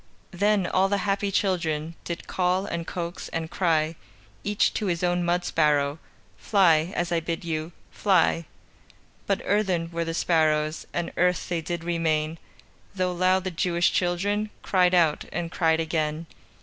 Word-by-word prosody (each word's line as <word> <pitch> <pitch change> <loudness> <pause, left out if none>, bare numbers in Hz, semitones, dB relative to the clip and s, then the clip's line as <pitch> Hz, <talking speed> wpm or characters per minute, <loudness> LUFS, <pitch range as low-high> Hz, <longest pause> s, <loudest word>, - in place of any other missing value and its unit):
Then 200 +1 +2
all 185 +2 +2
the 200 - +1
happy 200 0 0
children 165 -5 0
Did 170 -1 -5
call, 185 +1 0
and 170 -4 -4
coax, 170 -1 -5
and 165 0 -4
cry 160 -3 +1 0.5
Each 205 0 +1
to 210 - -2
his 175 -1 -1
own 175 0 +1
mud 175 +1 0
sparrow: 150 -2 +2 0.4
"Fly, 170 -5 +3
as 175 0 -1
I 170 - +2
bid 165 +1 -4
you! 160 0 -3 0.2
Fly!" 180 -4 +2 0.8
But - - 0
earthen 185 -5 0
were 170 0 -1
the 165 0 -3
sparrows, 155 -2 +1
And 175 -1 -3
earth 180 0 +1
they 170 -2 -1
did 170 +1 -4
remain, 160 -2 0 0.6
Though 185 -1 0
loud 185 +1 +2
the 185 - -3
Jewish 170 0 +1
children 200 +4 0
Cried 180 -1 +3
out, 165 -4 +3
and 170 -1 -3
cried 160 -2 +2
again. 160 0 -1
175 Hz, 155 wpm, -26 LUFS, 165-185 Hz, 0.8 s, Fly